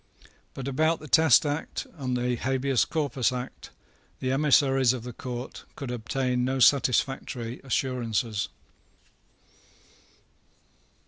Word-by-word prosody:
But 135 -1 -5
about 155 +4 +1
the 155 - -10
Test 160 -1 +5
Act 145 +2 -3
and 130 -5 -2
the 125 0 0
Habeas 130 +1 +1
Corpus 140 -6 0
Act 125 0 -6 0.5
the 130 - -1
emissaries 135 -2 +4
of 125 -3 -5
the 125 0 -7
Court 125 +1 -7
could 135 -3 -5
obtain 125 +1 -1
no 130 +1 0
satisfactory 130 -2 +2
assurances. 120 -5 -1
130 Hz, 110 wpm, -27 LUFS, 125-135 Hz, 0.5 s, Test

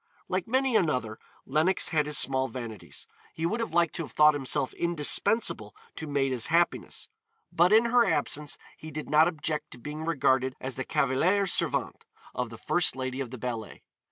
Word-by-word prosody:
Like 185 -1 -2
many 260 +1 +1
another, 125 - 0 0.3
Lenox 155 +7 +2
had 150 -3 +1
his 150 -2 +2
small 130 -1 +2
vanities; 115 -5 -8 0.3
he 165 - -2
would 215 +7 -1
have 230 - -3
liked 170 -1 +2
to - - -2
have - - -11
thought 150 0 +6
himself 135 -2 -1
indispensable 170 - +1 0.2
to 160 - -6
Maida's 135 -4 +1
happiness, 170 +1 0 0.4
but 175 +3 +3
in 220 +2 +6
her 240 0 +4
absence 150 0 -1 0.2
he 155 - -9
did 155 -2 -7
not 155 +2 +6
object 150 -2 -3
to - - -11
being 150 +6 -7
regarded 130 -5 +1
as 130 0 -4
the 130 - -4
cavaliere 180 +10 +1
servente 185 - 0 0.3
of - - -3
the - - -10
first - - +1
lady 130 0 -4
of 130 - -4
the 130 - -8
ballet. 115 -3 -6
150 Hz, 180 wpm, -28 LUFS, 130-170 Hz, 0.4 s, thought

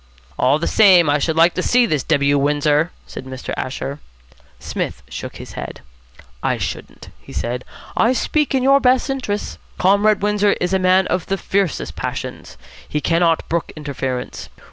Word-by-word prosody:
'" - - -29
"All 130 +3 +4
the 165 - -3
same, 180 -8 +5
I 145 - +2
should 160 +2 0
like 165 +2 +5
to 185 - -2
see 245 +5 +3
this 155 - 0
W. 145 -2 +2
Windsor," 150 +3 +2 0.2
said - - -8
Mr. 130 -1 -6
Asher. 140 +2 -4 0.6
Psmith - - -4
shook - - -7
his - - -9
head. - - -7 0.6
"I - - 0
shouldn't," - - -6
he - - -14
said. 125 +2 -3 0.3
"I 235 +3 +3
speak 295 +2 0
in 260 - +1
your 275 +1 +5
best 260 +1 +2
interests. 230 -6 -3 0.2
Comrade 200 +2 +3
Windsor 210 0 +3
is 180 +1 -1
a 190 - +3
man 185 0 +4
of 180 -1 -2
the 195 - -1
fiercest 195 -3 -1
passions. - - -6 0.3
He 150 - -1
cannot 165 +2 +1
brook 170 0 -2
interference. 135 -4 -4
175 Hz, 170 wpm, -19 LUFS, 145-205 Hz, 0.6 s, same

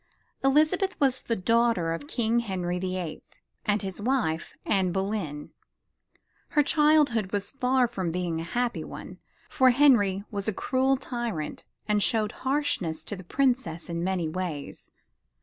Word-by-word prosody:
Elizabeth 310 +8 +3
was 265 -2 +2
the 230 - -1
daughter 225 -4 +2
of 225 +13 -6
King 235 -4 +1
Henry 180 -5 -2
the 185 0 -2
Eighth, 170 -4 -7 0.3
and 210 0 +2
his 190 +1 -5
wife, 210 -10 -1
Anne 190 -3 +2
Boleyn. 190 -6 -3 1.0
Her 300 -3 +3
childhood 290 -9 +3
was 200 -1 -1
far 255 -1 +2
from 190 -8 -3
being 170 -2 -2
a - - -4
happy 240 +8 -1
one, - - -9 0.3
for 260 -1 +4
Henry 235 -8 +4
was 200 -1 -3
a 220 - +1
cruel 265 +6 +1
tyrant 240 - -4 0.2
and 210 -1 +2
showed 215 0 +1
harshness 260 - -1
to 205 - -5
the 190 - -10
princess 210 - 0
in 170 0 -2
many 185 -3 0
ways. 155 -4 -5
210 Hz, 150 wpm, -27 LUFS, 180-255 Hz, 1.0 s, for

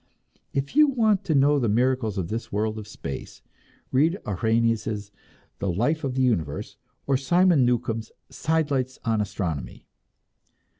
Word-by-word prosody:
If 140 - -3
you 305 0 +7
want 220 -7 +2
to 160 -5 +1
know 145 +1 +4
the 120 -4 +1
miracles 120 -2 +1
of 90 -3 -2
this 115 +2 -4
world 110 +1 -1
of 105 - -9
space, 70 -9 -7 0.5
read 160 +8 +3
Arrhenius' 110 0 0 0.5
"The 100 - -1
Life 125 - 0
of 130 -2 -2
the 130 - +2
Universe," 85 - -1 0.3
or 135 -1 +2
Simon 175 +1 +4
Newcomb's 115 -2 -1 0.2
"Sidelights 145 -5 0
on 110 -2 +1
Astronomy." 100 -8 -4
120 Hz, 140 wpm, -25 LUFS, 105-145 Hz, 0.5 s, you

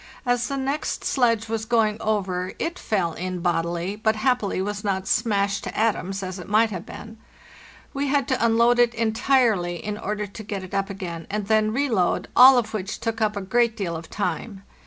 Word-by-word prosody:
As 245 0 +1
the 275 - -3
next 275 +3 -2
sledge 230 -4 +2
was 220 0 -2
going 220 -2 +1
over 185 -4 -1
it 335 +2 -3
fell 180 -6 -1
in 185 +1 -4
bodily, 175 +2 -1
but 220 +1 +1
happily 220 -4 0
was 205 +2 -3
not 190 -2 -1
smashed 200 -3 +1
to - - -6
atoms, 195 -3 0
as 185 0 -5
it 180 - -9
might 220 +1 +3
have 185 +1 -6
been. 220 0 -10 0.7
We 280 0 -1
had 280 -1 +1
to 260 -4 +1
unload 235 +1 +4
it 240 0 +3
entirely 225 -5 +2
in 210 +4 -5
order 210 0 -3
to 205 +2 -10
get 200 -2 -5
it 185 - -10
up 195 +1 -1
again, 175 -4 -6
and 210 0 -2
then 215 0 +2
reload, 230 -8 0
all 260 +1 +9
of 225 -2 -1
which 195 -2 -4
took 225 -1 -3
up 210 -1 +1
a - - -2
great 235 +3 +1
deal 175 -5 -2
of 165 0 -8
time. 195 +1 -4
210 Hz, 200 wpm, -24 LUFS, 190-230 Hz, 0.7 s, all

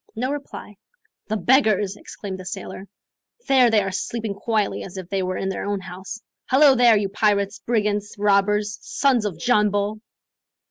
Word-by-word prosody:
No 255 +4 -2
reply. 275 -7 -7 0.5
"The 215 - -1
beggars," 215 -5 +2
exclaimed 195 -2 -8
the 185 - -9
sailor. 195 +1 -7 0.6
"There 260 -3 +5
they 215 -2 +3
are 195 - -3
sleeping 220 +2 -3
quietly 210 0 -1
as 190 0 -9
if 185 -2 -7
they 195 -1 0
were 185 0 -2
in 190 - -2
their 190 - -4
own 205 -1 -1
house. 185 +3 -8 0.3
Hallo 275 +1 +6
there, 240 -3 +5
you 205 -1 0
pirates, 205 0 0
brigands, 210 -3 -1
robbers, 210 +1 +1
sons 255 -6 +1
of 190 -6 -3
John 210 +3 +2
Bull!" 205 +1 -2
210 Hz, 170 wpm, -22 LUFS, 195-225 Hz, 0.6 s, Hallo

